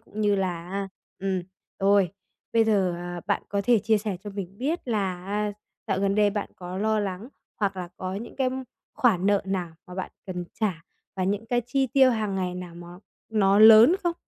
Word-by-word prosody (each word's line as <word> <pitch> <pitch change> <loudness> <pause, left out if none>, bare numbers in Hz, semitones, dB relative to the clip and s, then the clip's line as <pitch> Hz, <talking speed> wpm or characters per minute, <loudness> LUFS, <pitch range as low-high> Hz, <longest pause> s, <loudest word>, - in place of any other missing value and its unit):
cũng 215 -1 -8
như 205 -1 +3
là 180 -3 -2
á 195 0 -3 0.3
ừm, 190 -1 -1 0.4
rồi, 195 -2 +4 0.4
bây 230 -1 +4
giờ, 195 -5 +2
à, 175 0 -6
bạn 200 - 0
có 200 - 0
thể 235 0 +5
chia 220 +2 +2
sẻ 205 -2 -3
cho 205 - -5
mình 195 -1 -7
biết 295 +2 -2
là, 200 -5 0
a, 205 +1 -1 0.3
dạo 195 -3 0
gần 195 0 +1
đây 210 -1 +4
bạn 205 0 -3
có 180 +1 -6
lo 220 +1 +1
lắng 200 +3 -4 0.3
hoặc 200 -2 -1
là 180 -1 -5
có 185 0 -4
những 225 +4 -7
cái 265 -2 +2 0.5
khoản 195 -7 +2
nợ 200 -1 +3
nào 180 -4 -2
mà 180 - -10
bạn 190 - -4 0.2
cần 180 -2 -4 0.2
trả 185 -7 -1 0.3
và 185 - 0
những 205 +4 -1
cái 245 0 +1
chi 270 +2 +1
tiêu 265 +1 +5
hàng 215 -4 -1
ngày 180 -1 -2
nào 180 -2 -7
mà 175 0 -10 0.4
nó 200 -2 +3
lớn 220 +7 +9
không? 345 -1 0
200 Hz, 210 wpm, -26 LUFS, 185-220 Hz, 0.5 s, lớn